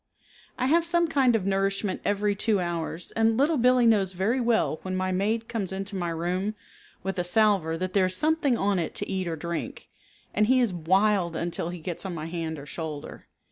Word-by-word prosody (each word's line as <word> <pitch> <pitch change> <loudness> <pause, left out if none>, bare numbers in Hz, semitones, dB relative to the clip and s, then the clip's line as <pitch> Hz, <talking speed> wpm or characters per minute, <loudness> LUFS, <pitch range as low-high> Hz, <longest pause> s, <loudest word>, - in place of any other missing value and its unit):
I - - 0
have 330 +5 +4
some 340 0 +2
kind 265 -6 +3
of 205 -4 0
nourishment 195 0 0
every 205 0 +1
two 205 0 +1
hours 170 -1 -3
and 225 0 +2
Little 290 +2 +2
Billee 250 0 +4
knows 200 -5 +3
very 215 +8 0
well 230 -9 +1
when 185 0 -4
my 185 0 -1
maid 215 +5 0
comes 205 -6 -3
into 195 +1 -4
my 175 -2 -2
room 180 +5 -2 0.5
with 195 0 -3
a - - +1
salver 180 -4 +2
that 185 +1 -3
there 190 -2 +3
is 185 - -3
something 300 - +2
on 200 -2 +1
it 165 - -3
to - - -3
eat 190 -2 -2
or 165 - -2
drink, 170 +2 -5 0.4
and 210 0 +2
he 260 +1 +4
is 235 -6 +2
wild 185 +1 +2
until 170 0 -3
he 175 - -5
gets 170 +1 -5
on 190 -3 -4
my 155 -1 -5
hand 165 -1 -4
or 140 - -9
shoulder. 155 -1 -7
195 Hz, 210 wpm, -26 LUFS, 175-225 Hz, 0.5 s, have